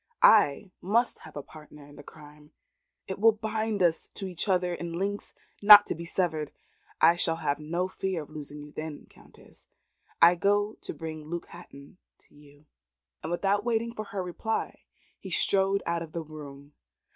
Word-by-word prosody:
"I 200 -2 +5
must 230 +6 +1
have - - -14
a 145 - -5
partner 150 -1 -14
in 145 0 -16
the - - -11
crime. 150 +1 -16 0.5
It 190 0 -5
will 225 +1 +6
bind 215 -1 -2
us 165 -2 +1
to 195 - -5
each 185 +2 -3
other 180 -1 +1
in 170 -1 -6
links 200 +4 -4 0.3
not 205 0 +10
to - - -2
be 170 +1 -8
severed. 160 -4 -2 0.5
I 165 +2 +6
shall 165 -1 +3
have 150 -3 -2
no 170 +4 -2
fear 185 -3 -3
of 150 - -17
losing 150 -1 -8
you 150 - -12
then, 155 -1 -7
Countess. - - -20 0.5
I 170 +1 +7
go 205 +4 +1
to - - -6
bring 155 -2 -7
Luke 170 +1 -5
Hatton 170 -1 -14 0.2
to - - -30
you." 145 0 -20 0.6
And 160 - -5
without 200 +3 0
waiting 230 0 -1
for 215 -2 -6
her 195 -2 -4
reply 180 +5 -4 0.3
he - - -9
strode 195 0 +1
out 170 0 -1
of 165 -2 -8
the 170 - -4
room. 145 -2 -11
170 Hz, 180 wpm, -28 LUFS, 150-200 Hz, 0.6 s, not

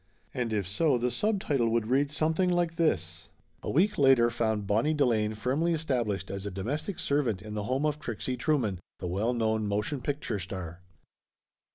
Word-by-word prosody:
And 125 -4 -2
if 105 -4 -1
so, 130 +7 +2
the 125 +1 0
subtitle 145 - +1
would 115 -1 +1
read 135 +5 +2
something 160 +4 +1
like 175 -2 0
this: 85 - 0 0.3
A - - -4
week 195 +5 +2
later 130 -4 +5
found 110 -3 0
Bonnie 115 +10 +2
Delane 110 -7 +2
firmly 135 +10 0
established 120 -11 -1
as 100 0 -4
a 100 - -3
domestic 135 - -3
servant 135 -9 0
in 105 +1 -8
the 105 -1 -3
home 130 +5 0
of 150 -1 0
Trixie 125 -2 -3
Trueman, 125 - 0 0.2
the 90 - -6
well 100 +7 0
known 110 -2 0
motion 105 +7 -1
picture 140 -7 -2
star. 90 -2 -6
120 Hz, 175 wpm, -29 LUFS, 105-150 Hz, 0.3 s, later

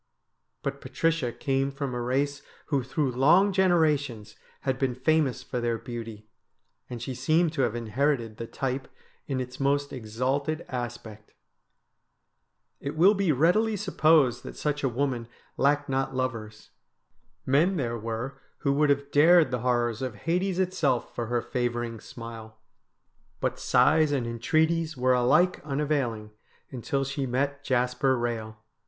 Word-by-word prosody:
But - - -3
Patricia 165 -7 0
came 135 +1 -1
from 140 -2 -4
a 120 - -3
race 140 +3 -1 0.3
who 140 -3 +2
through 135 +2 -1
long 170 +11 +4
generations 150 - +1 0.3
had 130 -1 -1
been 130 -3 0
famous 140 0 +1
for 125 - -4
their 120 -1 0
beauty, 115 -2 -8 0.6
and 120 - -6
she 130 +3 -5
seemed 155 +6 +1
to 145 - 0
have 120 -3 +1
inherited 120 0 -1
the 115 - -6
type 130 +1 -3 0.4
in 135 -2 -1
its 125 0 -6
most 140 +1 0
exalted 130 +7 -2
aspect. 120 -4 -6 1.5
It 140 - -5
will 190 +6 +6
be 195 -5 +1
readily 180 - +3
supposed 155 - +3
that - - -9
such 150 -1 -2
a 135 - +2
woman 125 -2 -2 0.3
lacked 145 +1 +2
not 135 -1 -1
lovers. 115 -4 -4 0.7
Men 160 +8 +3
there 120 -5 -1
were 115 +4 -5 0.2
who 140 -2 +2
would 150 +1 +2
have 140 0 0
dared 165 +2 +6
the 125 - -1
horrors 120 -1 0
of 130 -4 -3
Hades 180 - -1
itself 180 -9 0
for 120 - -3
her 120 0 -1
favouring 120 -2 -2
smile. 115 -1 -10 0.8
But - - -2
sighs 155 -1 +4
and 135 -4 0
entreaties 155 +7 0
were 130 0 +3
alike 150 +9 +3
unavailing 135 -7 -1 0.4
until 135 +2 -2
she 135 0 -3
met 140 +3 -1
Jasper 125 0 +1
Eehel. 115 -2 -3
135 Hz, 145 wpm, -27 LUFS, 120-150 Hz, 1.5 s, will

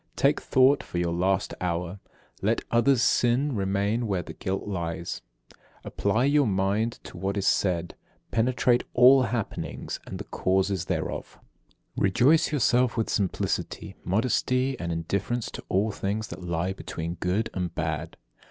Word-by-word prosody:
Take 140 +2 +2
thought 130 +2 +4
for - - -7
your 85 -1 0
last 95 +3 0
hour. 90 +1 -2 0.4
Let - - +1
another's 120 +1 +4
sin 125 +4 +2
remain 100 +4 0
where 95 -4 -1
the - - -9
guilt 95 +2 -3
lies. 85 -3 -4 0.3
30. - - -25 0.2
Apply 120 +4 0
your 145 -1 +4
mind 100 +4 +1
to - - -10
what 95 +2 -2
is 100 - -1
said. 90 -4 +1 0.4
Penetrate 120 +1 +2
all 130 +2 +8
happenings 115 -3 -3
and - - -5
the - - -6
causes 95 -1 0
thereof. - - -3 0.6
31. - - 0
Rejoice 130 +14 +4
yourself 125 -4 +2
with 115 - 0
simplicity, 100 -3 -2
modesty, 125 +5 +1
and 85 -1 -3
indifference 100 +8 -2
to - - -8
all 105 +4 +1
things 105 +2 -3
that - - -8
lie 85 +2 -1
between 85 -3 -5
good 95 +5 0
and 90 -3 -3
bad. 80 0 -3
100 Hz, 150 wpm, -27 LUFS, 90-120 Hz, 0.6 s, all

